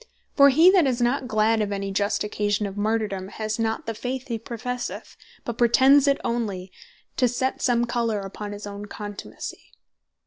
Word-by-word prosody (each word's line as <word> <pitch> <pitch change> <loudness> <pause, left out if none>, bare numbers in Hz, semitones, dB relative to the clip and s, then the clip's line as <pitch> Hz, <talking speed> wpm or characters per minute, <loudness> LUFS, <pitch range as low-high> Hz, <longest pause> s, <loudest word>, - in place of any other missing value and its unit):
For 280 -1 +8
he 320 +7 +6
that 365 -7 +4
is 255 -2 0
not 250 +2 +1
glad 220 0 +2
of 205 -1 -1
any 195 0 -3
just 200 +1 0
occasion 210 0 -1
of 195 -1 -5
Martyrdome, 205 -2 -1
has 215 +1 -3
not 225 0 -1
the 225 - -3
faith 255 +4 -4
be 230 -1 -2
professeth, 245 +2 -5 0.3
but 235 +1 -5
pretends 265 +4 +5
it 280 - +4
onely, 205 -6 -2 0.5
to 250 - +4
set 255 +2 -2
some 240 -1 +2
colour 235 -3 -1
upon 205 +2 -7
his 205 0 -7
own 205 0 -7
contumacy. 205 0 -8
225 Hz, 175 wpm, -24 LUFS, 205-250 Hz, 0.5 s, For